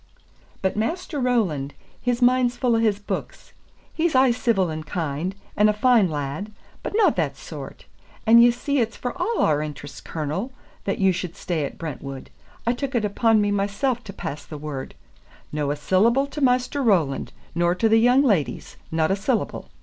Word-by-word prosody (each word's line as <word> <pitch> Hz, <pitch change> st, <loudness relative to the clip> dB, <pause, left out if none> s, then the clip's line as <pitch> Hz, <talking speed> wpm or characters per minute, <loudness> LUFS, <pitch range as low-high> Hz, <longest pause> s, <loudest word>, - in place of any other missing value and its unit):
But 190 Hz, -, +1 dB
Maister 300 Hz, -, -2 dB
Roland, 185 Hz, -, 0 dB, 0.3 s
his 245 Hz, 0 st, 0 dB
mind's 250 Hz, -1 st, +3 dB
fu' 245 Hz, -1 st, +2 dB
of 225 Hz, -, +2 dB
his 215 Hz, -3 st, +2 dB
books. 205 Hz, -, -6 dB, 0.4 s
He's 330 Hz, -2 st, 0 dB
aye 260 Hz, -1 st, +6 dB
civil 220 Hz, -7 st, +1 dB
and 155 Hz, 0 st, -5 dB
kind, 160 Hz, +3 st, -3 dB, 0.2 s
and 210 Hz, +1 st, +5 dB
a -, -, +3 dB
fine 220 Hz, -3 st, +4 dB
lad; 150 Hz, +7 st, -4 dB, 0.3 s
but -, -, -5 dB
no 445 Hz, -, +5 dB
that -, -, -2 dB
sort. -, -, -9 dB, 0.4 s
And 230 Hz, +1 st, +8 dB
ye 240 Hz, -, +7 dB
see 280 Hz, +4 st, -1 dB
it's 230 Hz, -1 st, -1 dB
for 245 Hz, -, -3 dB
a' 460 Hz, -, -2 dB
our 150 Hz, -1 st, +3 dB
interest, 145 Hz, -1 st, -7 dB
Cornel, 165 Hz, -, -3 dB, 0.3 s
that 195 Hz, -, -1 dB
you 190 Hz, -1 st, +4 dB
should 175 Hz, -1 st, -4 dB
stay 165 Hz, -5 st, -2 dB
at -, -, -7 dB
Brentwood. 140 Hz, -3 st, -7 dB, 0.3 s
I 235 Hz, -, +2 dB
took 270 Hz, +1 st, -4 dB
it 225 Hz, -3 st, +2 dB
upon 220 Hz, +1 st, +3 dB
me 205 Hz, 0 st, +1 dB
mysel 205 Hz, +6 st, 0 dB
to 220 Hz, -4 st, -10 dB
pass 155 Hz, -6 st, -6 dB
the 155 Hz, -, -8 dB
word, 145 Hz, -3 st, -6 dB, 0.6 s
'No 150 Hz, -1 st, -1 dB
a 145 Hz, -, 0 dB
syllable 220 Hz, -, +3 dB
to 290 Hz, +1 st, -7 dB
Maister 250 Hz, +2 st, +2 dB
Roland, 175 Hz, -, +1 dB, 0.2 s
nor 175 Hz, +1 st, +2 dB
to 225 Hz, -, +2 dB
the 225 Hz, 0 st, +5 dB
young 245 Hz, +4 st, +5 dB
leddies 200 Hz, -, 0 dB
no 160 Hz, 0 st, +1 dB
a 190 Hz, -, +2 dB
syllable. 215 Hz, +4 st, -2 dB
210 Hz, 185 wpm, -23 LUFS, 160-245 Hz, 0.6 s, And